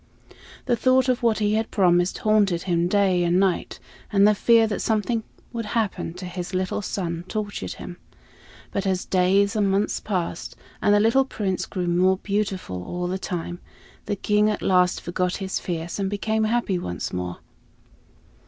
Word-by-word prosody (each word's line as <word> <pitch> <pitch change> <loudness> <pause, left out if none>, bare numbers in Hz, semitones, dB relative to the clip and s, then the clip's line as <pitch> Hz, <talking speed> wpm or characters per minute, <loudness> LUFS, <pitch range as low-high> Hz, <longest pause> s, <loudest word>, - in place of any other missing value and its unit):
The 245 - +2
thought 255 +2 +3
of 255 0 +1
what 230 -2 +2
he 210 -1 +1
had 220 +1 0
promised 180 -2 +2
haunted 205 -5 +2
him 175 -2 +1
day 190 -2 +2
and 175 +1 +2
night, 190 -3 0 0.3
and 200 0 +5
the 210 - +5
fear 230 +2 +4
that 215 -2 -2
something 220 +1 0 0.3
would 230 -2 -4
happen 200 -6 -2
to 180 +1 -7
his 180 0 -5
little 185 +2 -1
son 170 -4 -3
tortured 210 -1 -4
him. 175 - -9 0.7
But 195 0 -2
as 185 -1 0
days 195 +3 +2
and 205 -2 +2
months 195 +2 +1
passed, 180 -5 -3 0.3
and 205 - +3
the 205 - +5
little 230 +5 +4
Prince 195 -7 -2
grew 180 -3 -3
more 180 +2 +3
beautiful 195 - -3
all 175 - -4
the 185 +1 -2
time, 175 -2 -4 0.5
the 205 - 0
King 210 +1 +2
at 210 - -2
last 180 -1 +3
forgot 180 +1 -1
his 190 -1 -3
fears 170 +1 -4
and 195 -1 0
became 220 +2 0
happy 215 -5 0
once 90 - -4
more. 90 -1 -3
195 Hz, 170 wpm, -24 LUFS, 180-215 Hz, 0.7 s, and